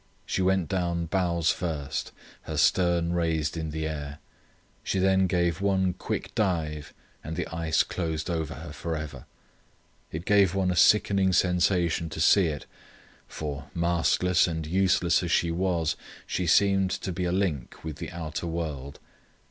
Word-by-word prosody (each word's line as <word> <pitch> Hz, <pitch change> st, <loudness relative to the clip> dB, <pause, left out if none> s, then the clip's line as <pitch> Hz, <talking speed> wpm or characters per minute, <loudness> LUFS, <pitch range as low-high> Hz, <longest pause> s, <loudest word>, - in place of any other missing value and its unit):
She -, -, -1 dB
went 95 Hz, -2 st, +2 dB
down 85 Hz, -1 st, -1 dB
bows 85 Hz, -2 st, +1 dB
first, 75 Hz, -6 st, -3 dB, 0.4 s
her -, -, -3 dB
stern 85 Hz, -2 st, +3 dB
raised 80 Hz, -3 st, 0 dB
in 80 Hz, -1 st, -3 dB
the 80 Hz, +1 st, -3 dB
air. 75 Hz, -2 st, -5 dB, 0.7 s
She -, -, -1 dB
then 95 Hz, 0 st, +3 dB
gave 85 Hz, -2 st, 0 dB
one 95 Hz, -2 st, +2 dB
quick 90 Hz, -, -4 dB
dive 75 Hz, -7 st, -1 dB, 0.3 s
and 80 Hz, +2 st, -5 dB
the 90 Hz, -, -2 dB
ice 80 Hz, -2 st, +2 dB
closed 80 Hz, -3 st, -3 dB
over 80 Hz, -4 st, -2 dB
her -, -, -8 dB
for 85 Hz, -1 st, -4 dB
ever. 75 Hz, -5 st, -7 dB, 0.9 s
It 80 Hz, +3 st, -5 dB
gave 100 Hz, -3 st, +4 dB
one 95 Hz, -2 st, +1 dB
a -, -, -1 dB
sickening 100 Hz, 0 st, +4 dB
sensation 90 Hz, -2 st, +2 dB
to 80 Hz, -, -7 dB
see 90 Hz, +3 st, +5 dB
it, 75 Hz, -3 st, -4 dB, 0.6 s
for, 75 Hz, -2 st, -6 dB
mastless 85 Hz, +1 st, +2 dB
and 80 Hz, -2 st, -3 dB
useless 90 Hz, +1 st, +2 dB
as 85 Hz, -, -3 dB
she 85 Hz, -, +2 dB
was, 85 Hz, -2 st, 0 dB, 0.3 s
she 90 Hz, -, -2 dB
seemed 95 Hz, +2 st, +4 dB
to 95 Hz, -, -3 dB
be 90 Hz, +1 st, -2 dB
a 90 Hz, -, 0 dB
link 90 Hz, -9 st, -2 dB
with 80 Hz, -3 st, -6 dB
the -, -, -6 dB
outer 85 Hz, 0 st, -5 dB
world. 75 Hz, -5 st, -4 dB
85 Hz, 155 wpm, -27 LUFS, 80-90 Hz, 0.9 s, see